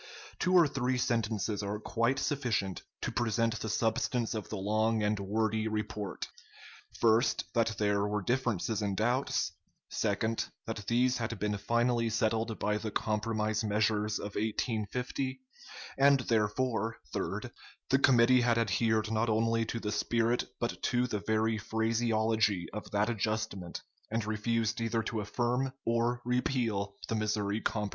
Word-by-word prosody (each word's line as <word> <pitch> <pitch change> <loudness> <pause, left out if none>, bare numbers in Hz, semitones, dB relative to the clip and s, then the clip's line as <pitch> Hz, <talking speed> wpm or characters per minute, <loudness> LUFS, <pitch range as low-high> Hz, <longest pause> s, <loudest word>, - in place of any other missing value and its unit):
Two 180 +1 +2
or 170 -3 +7
three 130 -2 0
sentences 110 -3 0
are 100 +1 -2
quite 115 +4 0
sufficient 115 -10 -1 0.2
to - - -2
present 115 -1 0
the 110 - -3
substance 115 +2 0
of 110 -2 -4
the 105 - -4
long 110 +3 +1
and 105 0 +1
wordy 110 +2 0
report. 105 -2 -3 0.7
First, 115 +2 +3
that 115 -2 +1
there 100 -1 +2
were 105 -1 -1
differences 120 -3 0
and 100 -2 -1
doubts; 120 +5 +1 0.4
second, 110 +1 0 0.2
that 110 -3 -5
these 125 +2 +3
had 115 -1 -3
been 105 +1 -1
finally 115 +3 +1
settled 110 0 0
by 105 0 0
the 110 - -3
compromise 110 0 -1
measures 105 0 +1
of 100 0 -6
1850; 120 +4 -2 0.6
and, 140 -1 +6
therefore, 115 0 0 0.2
third, - - -3 0.4
the 135 - +5
committee 125 -2 +5
had 120 -1 +3
adhered 110 0 +1
not 110 +1 +1
only 115 +1 +2
to 115 +1 -3
the 105 -2 -3
spirit 115 +3 +1
but 120 - -2
to 125 0 +1
the 110 -4 -2
very 110 +1 +1
phraseology 110 -3 +1
of 105 - -6
that 105 +1 +1
adjustment, 110 -5 -3 0.3
and 115 -1 -1
refused 110 +1 0
either 115 0 0
to 110 0 -2
affirm 120 +5 0
or 120 +1 +1
repeal 120 -5 0
the - - -2
Missouri 105 -1 0
Compromise. 105 -2 -1
110 Hz, 145 wpm, -31 LUFS, 105-120 Hz, 0.7 s, or